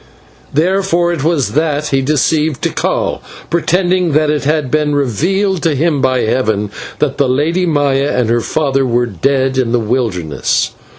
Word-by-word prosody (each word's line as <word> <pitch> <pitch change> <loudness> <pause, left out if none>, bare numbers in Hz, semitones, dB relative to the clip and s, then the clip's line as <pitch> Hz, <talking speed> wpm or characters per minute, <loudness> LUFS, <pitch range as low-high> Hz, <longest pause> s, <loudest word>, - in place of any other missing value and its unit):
Therefore 175 +2 +1
it 150 -5 -3
was 155 -4 +1
that 150 0 0
he 135 -1 +1
deceived 150 +1 0
Tikal, - - -1 0.3
pretending 180 0 +1
that 155 0 +2
it 150 -2 -2
had 150 -3 0
been 150 0 +1
revealed 175 - 0
to 160 -4 +1
him 150 0 +1
by 130 -2 +1
heaven 110 -3 0 0.3
that 140 -3 -1
the 140 -2 +2
Lady 165 +8 +1
Maya 145 -3 +1
and 125 -3 +1
her 120 +1 +1
father 135 0 0
were 120 -1 +1
dead 130 +5 0
in 120 -3 0
the 120 - +3
wilderness. 105 - -1
145 Hz, 160 wpm, -14 LUFS, 130-160 Hz, 0.3 s, the